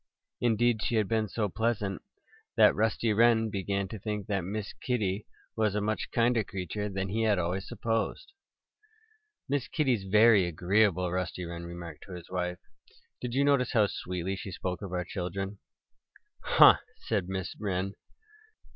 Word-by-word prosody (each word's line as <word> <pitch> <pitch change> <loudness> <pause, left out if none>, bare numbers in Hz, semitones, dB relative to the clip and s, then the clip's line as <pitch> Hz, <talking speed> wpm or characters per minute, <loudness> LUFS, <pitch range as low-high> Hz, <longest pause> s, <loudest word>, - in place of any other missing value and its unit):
Indeed, 120 -1 +2
she 120 - 0
had 110 -3 +2
been 110 0 +1
so 105 0 -1
pleasant 105 -1 -1 0.5
that - - +6
Rusty 110 +1 +1
Wren 115 0 +4
began 100 0 -1
to 110 - -7
think 105 0 -3
that 100 -2 -1
Miss 100 +3 -4
Kitty 105 -5 -1 0.3
was 110 -2 +1
a - - +2
much 110 +1 -2
kinder 115 -1 +2
creature 100 +2 -4
than 95 -1 -3
he 110 +4 -1
had 110 -3 +3
always 90 +2 -2
supposed. 115 - -2 1.1
"Miss 140 -2 -1
Kitty's 130 -10 0
very 105 0 +6
agreeable," 90 +1 +2
Rusty 90 0 -3
Wren 85 0 -6
remarked 85 -1 -8
to 95 - -9
his 90 -1 -10
wife. 90 -1 -2 0.6
"Did 125 -1 -4
you 140 - +3
notice 140 -3 +2
how 110 -3 +5
sweetly 90 -1 -3
she 95 +1 -7
spoke 90 +1 -4
of 100 -3 -6
our 90 -1 -2
children?" 95 +2 -4 0.8
"Huh!" - - +7 0.2
said 100 -5 -2
Mrs. 95 -1 -4
Wren. 100 -2 -2
100 Hz, 155 wpm, -29 LUFS, 90-110 Hz, 1.1 s, Huh